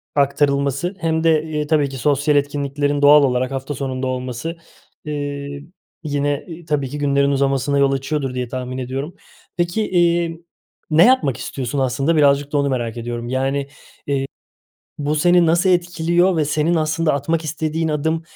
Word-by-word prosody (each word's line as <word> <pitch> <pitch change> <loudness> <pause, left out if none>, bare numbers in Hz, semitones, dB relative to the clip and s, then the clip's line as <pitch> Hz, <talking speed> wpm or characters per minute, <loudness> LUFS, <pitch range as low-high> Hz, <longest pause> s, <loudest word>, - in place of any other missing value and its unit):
aktarılması 140 +3 +1
hem 160 -2 0
de, 160 -2 +3
ııı, 150 0 -1
tabii 150 -2 +2
ki 135 - -7
sosyal 145 +3 +2
etkinliklerin 145 0 -1
doğal 145 +1 +7
olarak 125 -1 0
hafta 135 +2 -4
sonunda 130 0 -3
olması, 130 +5 -4 0.5
ııı, 145 -1 -4 0.4
yine 145 -1 -1 0.2
tabii 145 -4 -1
ki 145 - -5
günlerin 140 -1 +2
uzamasına 140 0 +1
yol 140 -1 +3
açıyordur 135 0 -2
diye 125 -1 -3
tahmin 130 0 -5
ediyorum. 135 +6 -4 0.4
Peki, 175 +5 0
iii, 170 -1 +1 0.5
ne 160 +3 +6
yapmak 245 - +3
istiyorsun 135 +1 -4
aslında? 135 +5 +1
Birazcık 145 -1 +3
da 145 - 0
onu 140 0 +1
merak 120 -3 -2
ediyorum. 120 0 -5
Yani, 135 +2 0
eee, 140 -1 -3 1.3
bu 145 0 -1
seni 175 +2 +4
nasıl 170 +4 +3
etkiliyor 175 0 +2
ve 155 - +2
senin 155 +3 +1
aslında 160 0 +1
atmak 160 +4 -1
istediğin 155 +1 -2
adım, 160 +2 -1
145 Hz, 155 wpm, -20 LUFS, 135-160 Hz, 1.3 s, doğal